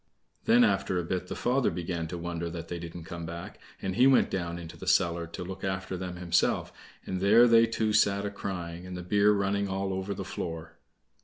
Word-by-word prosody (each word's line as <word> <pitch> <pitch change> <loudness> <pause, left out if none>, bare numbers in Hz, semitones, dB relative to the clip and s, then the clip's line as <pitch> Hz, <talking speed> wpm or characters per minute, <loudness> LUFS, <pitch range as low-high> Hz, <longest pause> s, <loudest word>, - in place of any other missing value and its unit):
Then 240 +2 +6
after 95 - +1
a 90 - 0
bit 90 +1 -3
the - - -5
father 130 +2 +1
began 85 -1 -3
to 85 - -5
wonder 85 0 -4
that 85 0 -7
they 85 - -4
didn't 85 0 -8
come 85 +1 -7
back, 85 +1 -7 0.2
and 95 -1 -2
he 125 +3 +6
went 135 - +4
down 85 -2 -2
into 85 -2 -9
the - - -10
cellar 85 0 +2
to 85 - -7
look 95 +1 -8
after 95 0 -2
them 90 0 -5
himself, 90 -1 +1 0.3
and 95 -1 -3
there 110 +5 +7
they 115 -1 +6
two 110 -1 0
sat 100 -1 +3
a 100 - -2
crying, 90 -3 -5
and 90 -1 -6
the 90 - -6
beer 100 +3 +4
running 100 0 +1
all 95 0 -2
over 95 +1 -3
the 95 - -5
floor. 80 -2 -6
90 Hz, 220 wpm, -29 LUFS, 85-100 Hz, 0.3 s, there